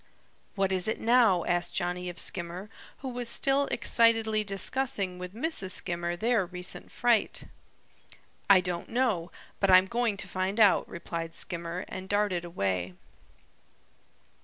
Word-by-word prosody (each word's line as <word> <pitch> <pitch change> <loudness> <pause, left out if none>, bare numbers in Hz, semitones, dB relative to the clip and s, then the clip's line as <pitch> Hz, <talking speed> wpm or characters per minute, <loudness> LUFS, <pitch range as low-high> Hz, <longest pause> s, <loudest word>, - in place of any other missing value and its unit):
"What 195 -2 0
is 185 0 0
it 220 - -1
now?" 225 -7 +3
asked 175 0 -1
Johnny 180 +1 -2
of 175 - -9
Skimmer, 175 +4 -2 0.3
who 265 - -4
was 245 -1 -3
still 275 +2 +3
excitedly 225 -1 +2
discussing 195 -2 -1
with 180 +2 -8
Mrs. 230 - +1
Skimmer 175 -2 0
their 225 +2 +1
recent 180 0 -3
fright. 240 -3 +1 1.1
"I 195 -2 +7
don't 175 -1 -4
know, 225 -9 0 0.3
but 195 - +2
I'm 185 0 +7
going 235 0 -1
to - - -5
find 190 +3 -2
out," 210 -3 +5
replied 165 -1 -6
Skimmer 170 +1 -5
and 185 0 -8
darted 205 -4 0
away. 95 - -2
190 Hz, 135 wpm, -28 LUFS, 175-225 Hz, 1.1 s, I